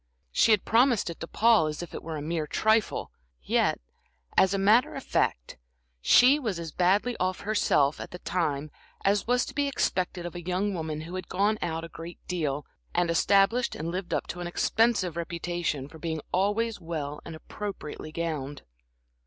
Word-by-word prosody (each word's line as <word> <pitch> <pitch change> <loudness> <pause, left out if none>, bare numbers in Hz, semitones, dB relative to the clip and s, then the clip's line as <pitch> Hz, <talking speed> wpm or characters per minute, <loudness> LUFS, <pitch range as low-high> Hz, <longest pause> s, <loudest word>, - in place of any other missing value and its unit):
She - - +4
had 215 -3 +4
promised 235 -5 +3
it 165 - -10
to 165 - -5
Paul 220 -6 +4
as 150 +2 -4
if 175 - -10
it - - -5
were 160 -1 -5
a 145 - -5
mere 160 -1 -2
trifle; 220 +4 +1 0.3
yet, - - +1 0.6
as 190 - +5
a 195 - +1
matter 220 +9 +4
of 270 - -6
fact, - - -1 0.4
she 255 - +6
was 220 - -2
as 165 -2 -5
badly 200 +9 +2
off 185 0 -1
herself 155 -9 +2
at - - -7
the 180 - -8
time 155 -5 -2 0.3
as 200 +2 +2
was 245 +1 +2
to - - -8
be 285 -1 +1
expected 185 -9 -1
of 175 - -5
a 175 - -6
young 185 +4 -1
woman 160 -3 -3
who 165 +3 -8
had 185 -2 -5
gone 210 +3 +1
out 165 -1 -2
a - - -5
great 165 +1 -9
deal, 150 -5 -2 0.3
and 175 -1 +2
established 200 +8 +3
and 165 +2 -4
lived 185 0 -4
up - - 0
to 180 - -5
an 175 - -3
expensive 200 -1 +1
reputation 170 -4 -3
for 160 +2 -13
being 160 -1 -3
always 205 +4 0
well 150 -3 -4
and 165 - -8
appropriately 160 -3 -7
gowned. 150 -4 -4
175 Hz, 185 wpm, -28 LUFS, 160-205 Hz, 0.6 s, she